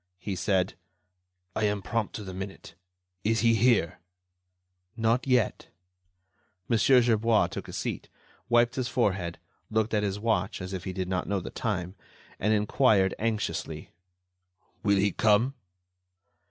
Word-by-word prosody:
He 95 +2 -4
said: 95 0 +1 0.8
"I 110 - +1
am 105 -1 -1
prompt 110 +3 -2
to 105 - -5
the 95 -1 -7
minute. 95 -1 -7 0.5
Is 110 0 +1
he 115 0 +4
here?" 115 -7 +2 1.0
"Not 115 +3 +1
yet." 125 -5 +1 1.0
Mon. 115 -2 +2
Gerbois 115 -3 +4
took - - -6
a - - -8
seat, - - -4 0.4
wiped 120 0 +4
his 130 -2 0
forehead, 95 -9 0 0.3
looked 110 0 0
at 105 - +2
his 100 -1 -1
watch 110 +1 0
as 95 0 -6
if 95 -1 -5
he 95 - -3
did 95 -1 -3
not 90 -2 -2
know 100 -1 0
the 85 - -7
time, 95 -5 -3 0.5
and 105 - +1
inquired, 105 -2 +3
anxiously: 110 -1 -3 0.9
"Will 100 -2 +3
he 100 +1 +2
come?" 110 +7 +3
105 Hz, 140 wpm, -28 LUFS, 95-115 Hz, 1.0 s, he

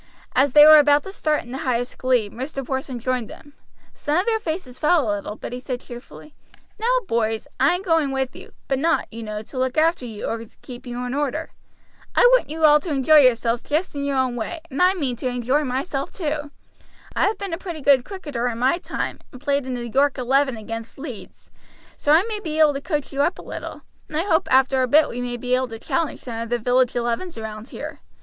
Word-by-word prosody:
As 270 0 +3
they 295 0 +9
were 310 0 +10
about 290 0 +4
to 385 - -8
start 305 -5 0
in 240 - -12
the 265 - -4
highest 245 -4 -2
glee, 250 -4 +2
Mr. 265 +5 -6
Porson 265 -1 -3
joined 250 -1 -2
them. 290 - -13 0.4
Some 295 +1 -1
of 365 - +2
their 450 -1 +1
faces 315 - -5
fell 305 -4 +3
a 205 - +1
little; 205 +1 -6
but 235 - -7
he 250 - -4
said 250 -1 -4
cheerfully: 245 +5 -12 0.5
"Now, 450 - -1 0.2
boys, 225 0 -1
I - - +4
am 365 - -5
going 325 -6 +2
with 265 -1 -2
you; - - -12 0.2
but 270 -1 0
not, 330 +3 +1
you 230 - -7
know, 215 -1 -5
to 255 - -7
look 260 +1 -1
after 315 -5 +2
you 215 -2 -6
or 225 0 -3 0.2
keep 250 0 -10
you 245 +1 -4
in 250 - -3
order. 295 +2 -2 0.6
I - - +5
want - - 0
you 315 +1 +1
all 300 0 +7
to 340 - -7
enjoy 295 +2 +4
yourselves 240 -3 +3
just 310 +5 -1
in 285 -1 -3
your 280 -1 -1
own 260 -2 +1
way, 245 +9 -4
and 270 - -2
I 365 +1 +5
mean 270 -9 -2
to 255 - -3
enjoy 250 +4 0
myself 275 +2 -3
too. 300 -4 -3 0.7
I - - +3
have 420 0 -1
been 395 -3 -5
a 330 - -3
pretty 345 -5 -6
good 270 -2 +5
cricketer 290 -9 -4
in 235 -2 -3
my 260 +8 +2
time, - - -4
and 255 - -11
played 280 -1 0
in 255 - -2
the 240 -1 -5
York 275 +4 +2
Eleven 265 0 +1
against 225 +1 -7
Leeds, 270 -6 -10 0.4
so 290 - 0
I 320 +4 +6
may 430 -1 -4
be 315 -6 -4
able 305 -2 +6
to 275 - -4
coach 295 -2 -3
you 275 - 0
up 345 - +1
a - - -10
little, - - -7 0.2
and 305 - -5
I 325 - +1
hope 350 -5 +1
after 265 0 +4
a 255 - +2
bit 300 +5 +5
we 245 - -5
may 245 0 -3
be 250 +1 -2
able 255 0 +2
to 225 -1 -8
challenge 320 +7 -2
some 230 -2 -5
of 230 - -5
the 240 - +1
village 245 +2 +2
elevens 240 +8 -2
round 220 +2 -7
here. - - -7
270 Hz, 240 wpm, -22 LUFS, 245-305 Hz, 0.7 s, were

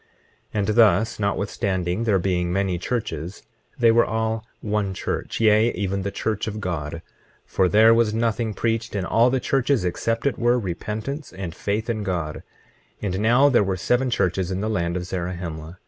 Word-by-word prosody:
25:22 - - +1
And 100 - 0
thus, 110 0 +4
notwithstanding 100 -1 -1
there 105 -4 +3
being 90 -1 0
many 95 -1 0
churches 90 -5 -4 0.3
they 120 -3 +5
were 115 +1 +5
all 110 0 -1 0.2
one 105 -3 -2
church, - - -3
yea, 110 +1 +4
even 100 -1 -2
the 100 - -2
church 105 +1 -2
of 110 -1 -4
God; 85 -4 -4 0.4
for 95 -1 +1
there 110 +3 +6
was 115 -2 +3
nothing 115 -1 -1
preached 115 -1 -1
in 95 -2 -1
all 115 +5 +4
the 130 +1 +1
churches 135 -4 +1
except 115 +7 -1
it 140 - 0
were 120 +1 +3
repentance 110 - -4
and 95 -3 -6
faith 105 +5 -2
in 115 -2 -2
God. 85 -6 -2 0.7
25:23 100 -3 -1
And 95 - -2
now 120 +6 +5
there 120 -6 +4
were 95 -1 -1
seven 125 +7 +1
churches 95 -5 0
in 95 0 -2
the 110 +1 -1
land 85 -3 -1
of 90 - -4
Zarahemla. 85 -2 -5
105 Hz, 180 wpm, -23 LUFS, 90-115 Hz, 0.7 s, there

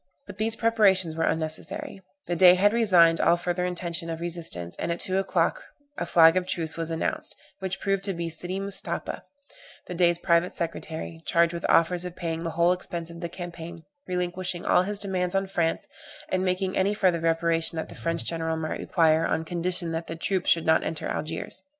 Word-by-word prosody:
But - - -11
these 220 +2 +1
preparations 200 -7 +2
were 165 0 0
unnecessary; 190 - -3 0.2
the 175 - -2
Dey 180 +1 +7
had 205 +3 +3
resigned 180 -8 +5
all 170 - +4
further 175 +1 -2
intention 170 -2 -4
of 165 0 -4
resistance, 165 - -3
and - - -2
at 170 - -3
two 190 0 +1
o'clock 195 - 0 0.3
a - - -4
flag 165 0 +6
of 185 -1 0
truce 165 -3 -2
was 165 -1 -3
announced, 165 0 -2 0.2
which 190 0 -4
proved 195 -1 -1
to 195 - -1
be 170 -1 -4
Sidy 175 +4 -2
Mustapha, 195 0 -4 0.6
the - - -6
Dey's 175 -1 +3
private 170 0 +1
secretary, 165 -1 -5
charged 170 -1 +3
with 170 - -3
offers 175 +1 +3
of 180 -1 -7
paying 165 -3 -4
the 165 - -3
whole 170 +1 +4
expense 170 -2 -4
of 170 +1 -10
the 170 - -4
campaign, 170 -1 -8 0.2
relinquishing 180 0 -2
all - - +4
his 205 +2 +4
demands 185 -2 +1
on 195 0 +1
France, 170 -4 -1 0.4
and 185 0 0
making 185 0 -1
any 195 +2 +1
further 185 -5 +2
reparation 165 0 +1
that 160 - -4
the - - -10
French 165 0 -2
general 160 -1 -1
might 155 -1 -4
require, 160 -2 +2
on 160 - -1
condition 175 0 0
that 165 +1 -4
the 165 - -5
troops 185 +2 -1
should 165 - +3
not 160 - +3
enter 160 - -3
Algiers. 155 - -3
175 Hz, 195 wpm, -26 LUFS, 165-185 Hz, 0.6 s, Dey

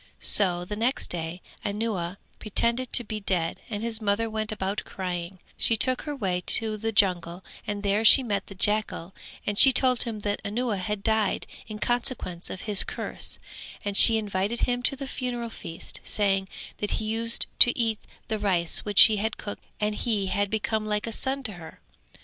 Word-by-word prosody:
So 180 -3 +2
the 210 - -5
next 235 +5 -1
day 170 +1 -5 0.2
Anuwa 200 -4 -3 0.2
pretended 235 +4 -1
to 240 - +5
be 215 -1 -5
dead 180 -5 -2
and 210 -1 -5
his 230 -1 -1
mother 215 +2 -1
went 215 0 -3
about 200 -1 -3
crying; 180 -1 -6 0.2
she 225 - +2
took 255 +2 +2
her 295 - -4
way 185 -8 -2 0.2
to 220 -1 -3
the 225 +1 -3
jungle 180 -3 0 0.2
and 205 0 -4
there 205 +2 +1
she 260 +4 +8
met 200 -5 -3
the 195 - -11
jackal 205 -3 -1 0.3
and 205 0 0
she 270 - +10
told 255 -1 +3
him 230 -3 -3
that 205 0 -3
Anuwa 215 0 -2
had 200 +2 -4
died 220 -2 0 0.2
in 215 -1 -7
consequence 235 -7 -2
of 185 - -7
his 205 -2 +4
curse - - -6 0.5
and 200 -1 -3
she 225 +2 +8
invited 205 +2 -2
him 245 0 0
to 265 - +1
the 275 0 -7
funeral 245 -3 -5
feast, 165 -6 -4
saying 195 -2 +1 0.3
that 210 - -3
he 220 - -4
used 225 +1 +3
to 240 - +7
eat 225 -3 0 0.3
the 220 -2 -3
rice 180 -5 +2
which 205 -2 -6
she 215 -2 +8
had 220 +2 -2
cooked 205 - -8 0.2
and 210 0 -1
he 210 -2 -1
had 200 +1 -1
become 220 0 -2
like 210 -1 -2
a 230 - -5
son 270 +4 -2
to 220 - -4
her. 170 -3 -12
210 Hz, 190 wpm, -25 LUFS, 195-230 Hz, 0.5 s, she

